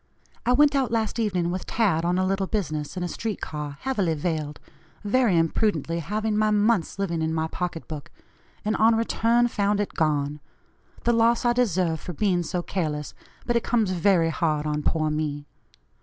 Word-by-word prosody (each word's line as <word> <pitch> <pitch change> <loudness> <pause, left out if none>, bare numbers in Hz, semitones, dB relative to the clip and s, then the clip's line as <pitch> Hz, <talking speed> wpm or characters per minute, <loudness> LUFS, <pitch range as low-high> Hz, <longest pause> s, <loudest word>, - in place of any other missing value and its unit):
I 245 - +5
went 290 +2 +5
out 270 -3 +1
last 225 0 -1
evening 180 -6 0
with 185 +1 -4
Tad, 195 -8 +1
on 175 +1 +1
a 185 - +2
little 195 0 0
business, 155 -7 -3
in 180 - -2
a - - -1
street 215 +3 -4
car, 150 -2 -5
heavily 200 -11 0
veiled, 150 -2 -3 0.4
very 215 -3 +3
imprudently 165 -1 +1
having 210 +6 -2
my 215 0 +3
month's 210 -4 +2
living 170 -5 -1
in 160 0 0
my 160 0 0
pocket 170 0 -4
book 150 -3 -7 0.6
and, 215 - +1
on 225 +1 +5
return, 230 +1 +2
found 205 -2 0
it 205 - -2
gone. 150 -2 0 0.6
The 240 - +3
loss 230 +1 +3
I 240 - +4
deserve 185 -9 +1
for 180 - -7
being 180 +1 +1
so 175 +1 -3
careless, 150 -6 -3 0.3
but 240 - 0
it 235 - +2
comes 225 -5 +1
very 175 -2 +3
hard 155 -2 0
on 150 0 -1
poor 155 0 0
me. 150 -1 -2
185 Hz, 185 wpm, -25 LUFS, 160-220 Hz, 0.6 s, I